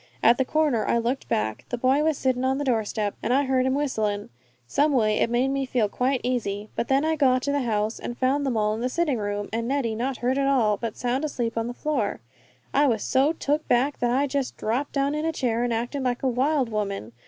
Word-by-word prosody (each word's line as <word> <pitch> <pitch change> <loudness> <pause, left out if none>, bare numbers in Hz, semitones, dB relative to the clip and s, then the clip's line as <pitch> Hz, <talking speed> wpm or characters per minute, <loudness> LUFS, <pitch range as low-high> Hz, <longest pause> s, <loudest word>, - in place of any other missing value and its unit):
At 235 +2 +5
the 265 - +2
corner 295 -7 +1
I - - +2
looked 240 +4 -2
back. 110 0 -1
The 245 - -2
boy 260 +4 +2
was 315 -2 +1
sittin' 255 -1 0
on 265 +1 +1
the 290 - -2
doorstep, 220 -4 0
an' 230 - -1
I 275 +3 +3
heard 260 -1 +1
him 260 - +1
whistlin'; 215 -8 -1 0.4
someway 235 - +2
it - - +2
made 245 +3 +1
me 275 0 0
feel 240 -4 +1
quite 255 +5 0
easy. 215 -4 -2
But - - -2
when 275 +3 +3
I 320 0 +1
got 255 -4 +3
to 285 - 0
the 285 0 +1
house 220 -2 -1
and 240 - -6
found 270 +3 +1
them 260 -5 0
all 210 0 +1
in 220 - -4
the 250 - 0
sitting 295 -4 0
room, 205 0 -3
and 230 +1 -1
Neddy 260 -4 0
not 250 +3 -2
hurt 255 +3 0
at 275 - +1
all, 235 -7 +3
but 230 -1 -5
sound 250 +3 -1
asleep 240 -6 -2
on 230 0 -1
the 245 - -5
floor, 260 -10 -1 0.5
I 285 +1 +4
was 225 -5 0
so 275 +4 +3
took 305 -1 -1
back 265 +4 +2
that 240 - +1
I 265 +4 +2
just 275 -1 -2
dropped 245 +6 -2
down 280 0 +1
on 300 - -2
a 325 - +1
chair 240 -6 -1
and 245 - 0
acted 240 +5 -2
like 250 -1 -1
a - - +2
wild 260 +1 +1
woman. 200 - -3
255 Hz, 245 wpm, -25 LUFS, 225-275 Hz, 0.5 s, At